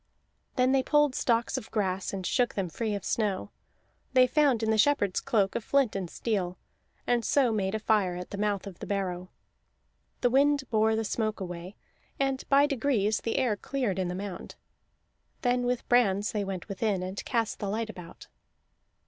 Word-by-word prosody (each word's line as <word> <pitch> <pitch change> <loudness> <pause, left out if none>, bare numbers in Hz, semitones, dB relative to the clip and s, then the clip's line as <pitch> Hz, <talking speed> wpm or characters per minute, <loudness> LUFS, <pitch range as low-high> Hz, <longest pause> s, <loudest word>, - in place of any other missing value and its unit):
Then 255 0 +3
they 270 0 +4
pulled 295 0 +3
stalks 235 +1 +1
of 220 - -13
grass 190 -3 -1
and 190 -2 -5
shook 245 +4 +1
them 190 -3 -1
free 215 +4 -2
of 200 - -6
snow; 205 -3 -1 0.6
they 255 -1 +7
found 265 -4 +2
in 220 - +2
the 220 - +2
shepherd's 210 -7 +3
cloak 200 -4 +1
a - - 0
flint 270 -1 +1
and 190 -3 -3
steel, 185 -5 -2 0.5
and 240 -1 +1
so 265 -2 +3
made 200 -2 -1
a - - -1
fire 210 -4 +1
at 180 0 -7
the 200 - -5
mouth 205 -1 0
of 195 -3 -9
the - - -7
barrow. 185 -2 -2 0.9
The 245 - +3
wind 280 +1 +4
bore 220 0 +3
the 225 0 -1
smoke 215 0 -1
away, 180 +1 -6 0.4
and 270 -1 0
by 280 +1 +6
degrees 235 -7 +1
the 230 - -2
air 250 -5 +2
cleared 220 -4 -2
in 185 - 0
the 180 - -3
mound. 190 -1 -6 0.9
Then 245 0 +1
with 250 -1 -1
brands 210 -4 +3
they 210 -2 -1
went 190 -2 -5
within, 200 -2 -1
and 185 +2 -5
cast 230 -4 -1
the 200 - -3
light 220 +2 -2
about. 180 -4 -12
215 Hz, 185 wpm, -28 LUFS, 195-245 Hz, 0.9 s, they